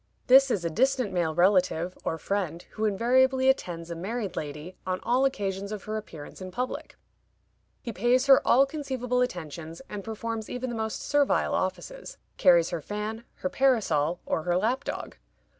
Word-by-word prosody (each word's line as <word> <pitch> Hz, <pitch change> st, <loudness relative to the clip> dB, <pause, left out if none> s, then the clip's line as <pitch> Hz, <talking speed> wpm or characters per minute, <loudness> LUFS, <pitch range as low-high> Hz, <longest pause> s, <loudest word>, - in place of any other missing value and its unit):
This 270 Hz, +2 st, +7 dB
is 185 Hz, -8 st, -1 dB
a -, -, +1 dB
distant 255 Hz, -, +1 dB
male 165 Hz, -3 st, 0 dB
relative, 180 Hz, -1 st, +2 dB
or 165 Hz, -, -2 dB
friend, 175 Hz, -2 st, -3 dB
who 220 Hz, -, -2 dB
invariably 260 Hz, +5 st, +3 dB
attends 170 Hz, -9 st, -1 dB
a -, -, -3 dB
married 200 Hz, +3 st, -4 dB
lady 150 Hz, +4 st, -6 dB
on 185 Hz, 0 st, -2 dB
all 255 Hz, +3 st, +2 dB
occasions 200 Hz, -6 st, -2 dB
of 210 Hz, -2 st, -5 dB
her 215 Hz, -, -4 dB
appearance 170 Hz, -6 st, -8 dB
in 185 Hz, -, -6 dB
public. 250 Hz, +7 st, -4 dB, 0.9 s
He 235 Hz, -, -5 dB
pays 245 Hz, +6 st, +2 dB
her 275 Hz, -1 st, +7 dB
all 265 Hz, +3 st, +5 dB
conceivable 260 Hz, -4 st, -2 dB
attentions, 165 Hz, -, -4 dB
and 205 Hz, -1 st, -6 dB
performs 225 Hz, 0 st, -5 dB
even 250 Hz, 0 st, -4 dB
the -, -, -4 dB
most 220 Hz, -1 st, -3 dB
servile 290 Hz, -1 st, +2 dB
offices; 190 Hz, -, -3 dB, 0.2 s
carries 170 Hz, -2 st, +5 dB
her 170 Hz, -2 st, -3 dB
fan, 210 Hz, +5 st, -5 dB
her 275 Hz, -, -3 dB
parasol, 185 Hz, -, +2 dB
or -, -, -1 dB
her 175 Hz, +2 st, 0 dB
lapdog. 245 Hz, +8 st, -2 dB
210 Hz, 165 wpm, -27 LUFS, 175-250 Hz, 0.9 s, This